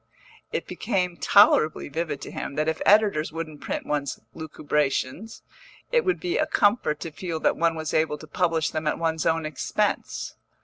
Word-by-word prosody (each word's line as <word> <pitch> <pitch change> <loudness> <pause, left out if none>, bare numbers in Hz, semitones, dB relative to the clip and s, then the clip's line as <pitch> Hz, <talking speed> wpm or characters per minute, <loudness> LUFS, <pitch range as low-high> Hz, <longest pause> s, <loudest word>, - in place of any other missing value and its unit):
It - - -2
became 180 -6 -1
tolerably 170 -5 +4
vivid 155 -1 -3
to - - -7
him - - -5
that 155 +1 0
if 160 0 -1
editors 205 -8 +4
wouldn't 155 -2 -6
print - - -4
one's 145 -2 -2
lucubrations, 150 +4 -2 0.5
it 480 -1 +3
would 375 -2 0
be 360 +6 -1
a - - +2
comfort 205 -8 +2
to 165 - -5
feel 165 0 -4
that - - +2
one 165 0 +1
was 160 -1 -4
able 155 -1 +1
to 155 - -11
publish 165 -1 0
them 155 -1 -3
at - - +1
one's 160 -1 0
own 165 -1 +1
expense. 155 -4 -2
160 Hz, 175 wpm, -25 LUFS, 150-180 Hz, 0.5 s, tolerably